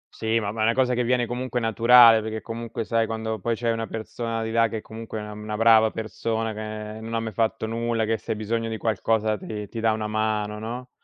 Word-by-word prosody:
Sì, 110 +1 0
ma 100 -2 -2
ma 110 - -4
è - - +3
una 115 - +3
cosa 130 -1 +2
che 125 0 +1
viene 125 0 +2
comunque 125 +1 -3
naturale, 115 0 +7
perché 110 0 -4
comunque, 115 0 -5
sai, 115 0 +1
quando 110 -1 -3
poi 115 +3 -1
c'hai 115 0 0
una 115 0 -2
persona 115 +1 -4
di 110 - -3
là 115 0 +4
che 110 0 -4
comunque 110 0 -8
è 105 - -4
una 105 - -7
una 105 0 -5
brava 110 -1 +6
persona, 110 0 -3
che 110 0 -6
non 115 +1 -5
ha - - +1
mai 110 -1 -4
fatto 110 +1 0
nulla, 115 0 -1
che 110 0 0
se - - -17
hai 105 - -7
bisogno 115 +1 -2
di 110 - -3
qualcosa 110 0 0
ti 105 0 -6
ti 115 - -6
dà 110 0 +3
una 110 0 -2
mano, 105 -1 -1
no, 120 +3 -6
110 Hz, 245 wpm, -25 LUFS, 110-115 Hz, -, naturale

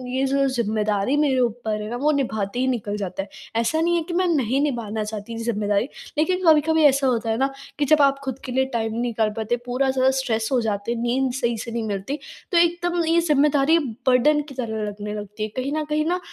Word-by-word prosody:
ये 265 - +1
जो 275 +1 +2
ज़िम्मेदारी 215 -1 0
मेरे 280 -3 +2
ऊपर 225 -3 -1
है 210 - -5
ना 240 - -3
वो 295 +4 +2
निभाते 235 -6 -1
ही 260 - +1
निकल 210 -5 -2
जाता 195 -1 -3
है। 195 - -14 0.3
ऐसा 235 +8 +1
नहीं 345 +1 +2
है 340 - +1
कि 355 - -4
मैं 365 +1 +2
नहीं 270 -5 +1
निभाना 230 -7 -2
चाहती 210 +1 -6
ये 225 - -5
ज़िम्मेदारी 210 -1 0 0.3
लेकिन 365 +5 +1
कभी-कभी 320 0 +5
ऐसा 275 -1 +4
होता 230 -3 0
है 220 - +1
ना 270 +2 +1 0.3
कि 290 - +2
जब 305 +1 +4
आप 275 0 +1
खुद 265 -1 -4
के 255 - -5
लिए 265 +1 +2
टाइम 225 -1 -1
नहीं 230 +2 -2
निकाल 230 -3 0
पाते, 220 +2 0
पूरा 255 +2 0
ज़्यादा 260 0 +3
स्ट्रेस 225 -4 -1
हो 260 - +3
जाते 210 0 -2
हैं, 235 - -2
नींद 255 +2 +1
सही 240 -3 -1
से 230 +2 -6
नहीं 230 0 -2
मिलती। 205 +6 -3 0.3
तो 350 - +3
एकदम 345 0 +2
ये 330 +1 +3
ज़िम्मेदारी 300 -1 +3 0.3
बर्डन 275 +4 +4
की 275 - -10
तरह 220 -4 -3
लगने 205 0 -5
लगती 210 0 -6
है, 215 - -2
कहीं 260 +2 -2
न 310 - 0
कहीं 305 +1 0
ना 355 +2 0
250 Hz, 235 wpm, -23 LUFS, 220-290 Hz, 0.3 s, कभी-कभी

